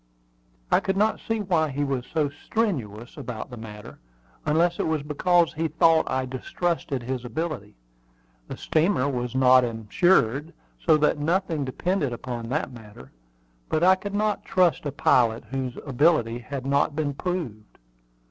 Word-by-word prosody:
I - - +5
could 195 0 -2
not 215 +2 +2
see 225 -1 -2
why 170 -6 +1
he 145 +1 -2
was 135 -3 -2
so 155 -2 +1
strenuous 140 - -3
about 120 0 -6
the - - -6
matter, 105 -2 -10 0.5
unless 170 +3 +2
it - - 0
was 160 -2 -1
because 170 +3 +2
he 160 +1 -1
thought 160 +1 +3
I 130 0 0
distrusted 135 +1 -3
his 130 0 -3
ability. 125 - -4 0.7
The - - -7
steamer 155 -3 +1
was 125 -2 -3
not 130 -1 +6
insured, 125 - +1 0.3
so 160 -3 +5
that 150 0 +2
nothing 165 -1 0
depended 145 +1 -1
upon 120 -1 -5
that 150 +2 -1
matter; 105 - -13 0.6
but 155 - +1
I 185 +1 +7
could 200 +2 -4
not 210 -1 0
trust 180 -4 +2
a - - -2
pilot 115 -3 +2
whose 130 -2 -3
ability 135 -4 +2
had 135 +1 -6
not 140 +1 +1
been 150 -2 -1
proved. 140 - -5
145 Hz, 155 wpm, -25 LUFS, 125-170 Hz, 0.7 s, I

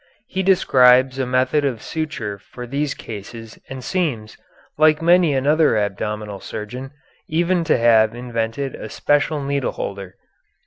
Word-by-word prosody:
He 190 -6 -3
describes 130 -8 +4
a 130 - -1
method 130 +3 +1
of 130 -5 -1
suture 120 -11 -4
for 125 +5 -10
these 140 +3 -2
cases 110 +1 -9
and 130 -1 -7
seems, 130 - -2 0.4
like 155 0 +4
many 170 -2 +4
another 145 -1 +3
abdominal 105 0 -3
surgeon, 125 +8 -7 0.4
even 175 +2 +1
to 160 - +3
have 115 -1 +4
invented 120 +2 -3
a - - -8
special 145 +1 0
needleholder. 110 -9 -3
130 Hz, 130 wpm, -20 LUFS, 110-150 Hz, 0.4 s, describes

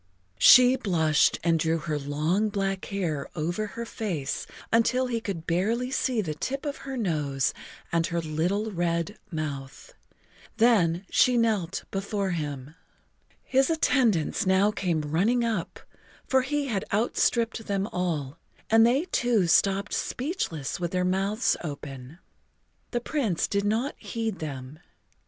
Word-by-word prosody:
She 250 0 +8
blushed 160 - +2
and 165 -1 +2
drew 160 +1 +1
her 155 -2 -3
long 155 +9 0
black 195 -2 -2
hair 165 -8 -3
over 175 +7 -2
her 235 +3 -6
face 180 -12 -3 0.3
until 250 +3 +3
he 235 -2 -2
could 185 -7 -5
barely 225 +9 0
see 255 -4 0
the 160 -6 -3
tip 270 - -4
of 285 -1 -3
her 265 - -4
nose 150 - 0 0.4
and 165 -1 +1
her 170 - -1
little 175 +7 -1
red 170 +2 -1
mouth. 150 - -6 0.6
Then 200 -6 +3
she 250 -1 +4
knelt 210 -6 0
before 195 0 -2
him. 145 -4 -4 0.7
His 270 +2 +2
attendants 240 - +2
now 190 +2 +4
came 180 -6 -1
running 190 +12 +1
up, 220 -7 -2 0.5
for 265 -1 +3
he 290 +2 -1
had 210 -8 -1
outstripped 225 +1 +1
them 195 -1 0
all, 165 -7 -3 0.3
and 225 +1 +7
they 270 +7 +2
too 240 - +1
stopped 195 +3 +2
speechless 245 - -3
with 175 -1 -1
their 180 +1 0
mouths 195 +5 +1
open. 140 -2 -7 0.7
The 240 - -2
Prince 235 - -1
did 200 0 -1
not 230 +7 0
heed 225 -4 -4
them. 140 -1 -7
195 Hz, 140 wpm, -27 LUFS, 160-230 Hz, 0.7 s, She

